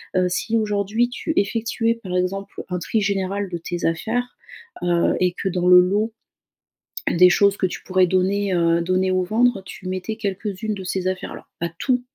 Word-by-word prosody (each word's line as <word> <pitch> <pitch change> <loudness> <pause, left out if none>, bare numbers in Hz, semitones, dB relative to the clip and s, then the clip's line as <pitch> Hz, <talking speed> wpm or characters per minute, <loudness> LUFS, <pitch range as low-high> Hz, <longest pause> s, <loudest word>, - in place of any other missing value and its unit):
Heu, 185 0 +3
si 225 +5 0
aujourd'hui 210 +2 0
tu 315 +5 -3
effectuais 230 +2 +1
par 180 -2 -4
exemple 195 +2 -3
un 180 - -2
tri 215 +5 -1
général 200 0 -1
de 175 - -2
tes 175 +1 -4
affaires, 230 +9 -1 0.5
heu, 175 -1 +2
et 180 -1 +2
que 195 - -4
dans 180 0 -1
le 180 0 +9
lot, 205 +5 +2 1.0
des 180 +1 +6
choses 200 +2 +3
que - - +1
tu - - -8
pourrais 185 -1 +3
donner, 190 +2 +1
heu, 170 0 +3
donner 185 +2 +1
ou 185 0 +2
vendre, 225 +1 +2
tu 185 0 -9
mettais 185 +4 -3
quelques-unes 210 0 -3
de 190 - -7
ces 185 0 -2
affaires-là, 185 -1 -6
pas 170 0 -2
tout, 255 -2 +1
190 Hz, 185 wpm, -22 LUFS, 180-215 Hz, 1.0 s, le